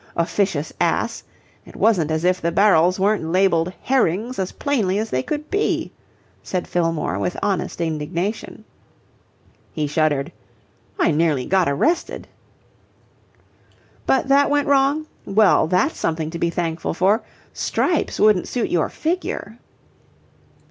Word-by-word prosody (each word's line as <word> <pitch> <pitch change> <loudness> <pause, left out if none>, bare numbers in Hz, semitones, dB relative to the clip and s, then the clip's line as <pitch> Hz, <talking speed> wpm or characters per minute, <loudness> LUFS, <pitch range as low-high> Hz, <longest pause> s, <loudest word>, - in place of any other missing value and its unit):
Officious 170 -2 -1
ass! - - 0 0.4
It - - -15
wasn't 180 -9 +2
as 160 +1 -1
if 180 +1 +1
the 170 - 0
barrels 185 -2 +4
weren't 205 -1 +1
labelled 180 -1 +2
'Herrings' 240 -2 0
as 190 -1 -2
plainly 220 -10 0
as 220 +1 -3
they 130 - 0
could 300 - -5
be," 405 +2 0 0.5
said 180 -2 -3
Fillmore 165 - -1
with 95 -3 -2
honest 195 -4 -1
indignation. 170 +7 -3 1.1
He 155 - -2
shuddered. 150 0 0 0.7
"I - - +3
nearly 150 -4 +1
got 185 -4 +2
arrested." 315 - -1 1.8
"But 265 - +2
that 280 +1 +4
went 290 0 +1
wrong? 280 +2 +2 0.2
Well, 195 -4 +4
that's 185 - +1
something 160 -1 -2
to 170 - -6
be 170 - +1
thankful 165 -1 -3
for. 195 +6 +2 0.3
Stripes 350 -4 -1
wouldn't 210 -4 +4
suit 245 - -2
your 170 -3 +1
figure." 350 +4 -3
185 Hz, 125 wpm, -21 LUFS, 160-225 Hz, 1.8 s, barrels